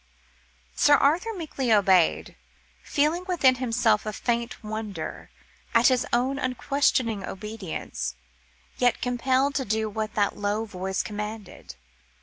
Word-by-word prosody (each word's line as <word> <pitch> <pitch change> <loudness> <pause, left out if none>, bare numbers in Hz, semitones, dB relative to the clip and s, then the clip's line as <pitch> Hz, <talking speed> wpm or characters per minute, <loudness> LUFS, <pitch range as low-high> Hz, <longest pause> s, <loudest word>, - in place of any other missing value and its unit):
Sir 290 - +5
Arthur 325 +11 +2
meekly 285 -8 -3
obeyed, 190 -5 +3 0.5
feeling 305 +5 +1
within 320 -8 +4
himself 230 -3 +1
a - - -1
faint 235 +2 -2
wonder, 215 -5 -6 0.5
at 230 +3 +6
his 255 -1 +1
own 260 +3 +1
unquestioning 255 -4 0
obedience, 195 - -5 0.6
yet 245 -1 +3
compelled 260 +3 +1
to 275 - -1
do 220 -1 -1
what 215 0 -4
that 205 -1 +1
low 205 +2 -1
voice 190 -2 -3
commanded. 210 - -7
230 Hz, 120 wpm, -26 LUFS, 210-260 Hz, 0.6 s, at